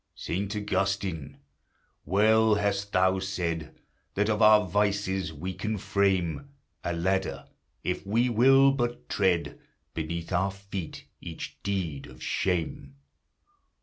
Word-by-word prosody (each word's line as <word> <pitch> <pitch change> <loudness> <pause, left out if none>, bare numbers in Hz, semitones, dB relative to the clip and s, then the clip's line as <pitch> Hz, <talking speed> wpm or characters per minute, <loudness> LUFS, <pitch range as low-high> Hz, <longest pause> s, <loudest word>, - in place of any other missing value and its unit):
Saint 100 +4 -3
Augustine! 95 -5 -2 0.7
well 110 +4 +4
hast 100 0 -1
thou 95 +1 +3
said, 85 -4 -3 0.4
That 105 +2 +2
of 105 +1 0
our 105 -1 +7
vices 95 -2 0
we 85 +5 -5
can 110 +3 -3
frame 95 - 0 0.3
A 85 - -1
ladder, 95 +3 -1 0.4
if 90 - -2
we 115 +5 +2
will 135 +4 +6
but 120 -3 -2
tread 95 -4 +1 0.3
Beneath 85 +2 -4
our 95 +2 +2
feet 95 -3 -7 0.2
each 80 -2 -8
deed 85 -8 -3
of - - -12
shame! 80 -6 -2
95 Hz, 115 wpm, -28 LUFS, 85-105 Hz, 0.7 s, our